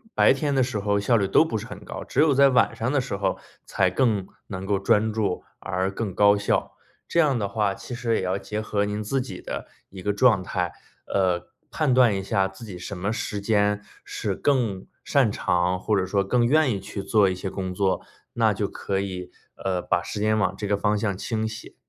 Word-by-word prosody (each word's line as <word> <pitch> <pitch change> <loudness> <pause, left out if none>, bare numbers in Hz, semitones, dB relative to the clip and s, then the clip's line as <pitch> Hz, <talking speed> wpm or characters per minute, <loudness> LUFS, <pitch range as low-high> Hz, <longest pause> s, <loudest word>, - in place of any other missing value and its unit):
白 - - +6
天 140 +1 -1
的 135 - +3
时 125 -4 -2
候 100 0 +1
效 115 +4 +3
率 100 -2 +1
都 100 - +5
不 115 - -2
是 105 - -6
很 - - -10
高， - - -6
只 - - -3
有 150 -1 +5
在 140 +1 +6
晚 125 -3 +3
上 115 +3 -1
的 145 -2 +2
时 115 - -4
候 95 -1 -1 0.3
才 - - +2
更 110 -7 +1 0.2
能 95 -1 -5
够 100 0 +1
专 105 +3 +2
注 105 -4 -1 0.2
而 95 0 -1
更 100 -1 -4
高 100 +1 +5
效。 100 - 0 0.3
这 170 - +1
样 145 -7 +3
的 100 - -1
话 105 -2 0
其 125 - -8
实 115 -1 0
也 - - -1
要 95 +1 -1
结 105 +2 -4
合 105 -1 0
您 105 +1 -3
自 135 +6 0
己 125 -8 -6
的 - - -6 0.2
一 95 -1 -10
个 105 - +1
状 105 -3 +4
态， 90 -1 -2 0.4
呃， 90 -3 0 0.2
判 155 -4 +1
断 125 -5 +5
一 95 - -2
下 95 0 +1
自 95 +4 -13
己 95 -5 -8
什 100 - -6
么 95 +4 -1
时 105 -2 -3
间 105 -1 +2 0.2
是 - - -3
更 115 -9 0 0.2
擅 135 -7 +3
长， 90 -1 +1
或 105 +2 +1
者 95 - +1
说 100 +1 +1
更 120 +5 +2
愿 145 +2 +4
意 100 - -2
去 100 +1 -6
做 105 0 +3
一 - - -1
些 95 +1 -4
工 95 -1 -4
作， 95 0 +1 0.3
那 - - +3
就 - - -1
可 95 -1 -3
以 95 -2 -5 0.2
呃， 95 -2 -2
把 90 0 0
时 105 - -5
间 110 +1 +2
往 105 - +1
这 105 - -4
个 100 0 +1
方 105 +1 +1
向 100 -3 -1
倾 110 +2 -2
斜。 110 - -8
105 Hz, 245 characters per minute, -25 LUFS, 95-115 Hz, 0.4 s, 白